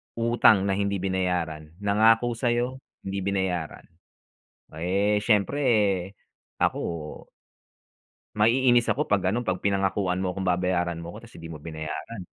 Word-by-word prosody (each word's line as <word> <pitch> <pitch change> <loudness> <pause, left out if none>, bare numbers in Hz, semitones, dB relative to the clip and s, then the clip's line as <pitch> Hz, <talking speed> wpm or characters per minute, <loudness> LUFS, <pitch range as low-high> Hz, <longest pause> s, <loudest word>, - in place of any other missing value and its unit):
Utang 115 -3 +4
na 95 - +1
hindi 100 0 0
binayaran 90 -5 -2
nangako 115 +3 +3
sa'yo 120 +2 0 0.3
hindi 95 0 -3
binayaran. 95 -5 -2 0.9
Eh, 100 +5 +1
siyempre 115 +6 +2 1.0
ako - - +2 1.6
maiinis 120 +2 +4
ako 145 - +1
'pag 95 -2 +2
ano 120 +6 0
'pag 95 -3 -1
pinangakuan 95 -2 0
mo 90 - -1
akong 95 0 -4
babayaran 90 -1 0
mo 85 - -7
'ko 105 - -10
tapos - - -20
hindi 80 0 -9
mo 80 - -8
binayaran. 80 +6 -6
95 Hz, 125 wpm, -26 LUFS, 90-115 Hz, 1.6 s, Utang